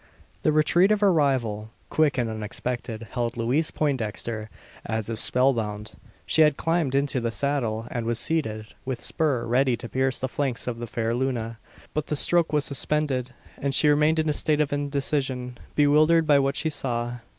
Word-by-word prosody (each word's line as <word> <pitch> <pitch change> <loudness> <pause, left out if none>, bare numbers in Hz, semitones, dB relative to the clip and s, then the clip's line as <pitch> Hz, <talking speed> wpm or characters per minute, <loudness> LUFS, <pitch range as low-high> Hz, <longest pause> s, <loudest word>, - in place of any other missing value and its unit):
The 155 - +2
retreat 170 +6 +4
of 210 -1 +2
her 200 -3 +5
rival 120 -8 0 0.2
quick 155 -3 +2
and 120 -2 +1
unexpected 110 +1 -5
held 120 -2 -2
Louise 130 +7 +1
Poindexter, 115 -6 -2 0.3
as 110 0 -3
if 110 - -4
spell 130 +3 +3
bound. 105 -2 -4 0.3
She 160 - +3
had 150 -2 +4
climbed 165 -5 0
into 140 -1 +1
the 115 -1 -1
saddle, 115 -4 -1
and 115 -2 -3
was 120 -1 0
seated, 110 -8 -1
with 125 -1 -5
spur 140 -7 0
ready 125 +1 +2
to 120 - -7
pierce 130 +1 0
the 130 - -2
flanks 130 -2 -3
of 120 -2 -4
the 120 - -5
fair 115 0 -2
Luna. 120 -3 -2 0.3
But 155 -1 -2
the 150 - -1
stroke 170 +3 +4
was 150 -2 +2
suspended, 135 -3 0 0.2
and 140 -1 -1
she 150 - +4
remained 150 +2 +3
in 160 0 +1
a 150 - +2
state 150 +1 +1
of 150 -2 +1
indecision 140 -3 -2 0.2
bewildered 155 +3 +4
by 145 -2 +5
what 135 0 0
she 160 - -1
saw. 120 -3 -2
130 Hz, 185 wpm, -25 LUFS, 115-150 Hz, 0.3 s, her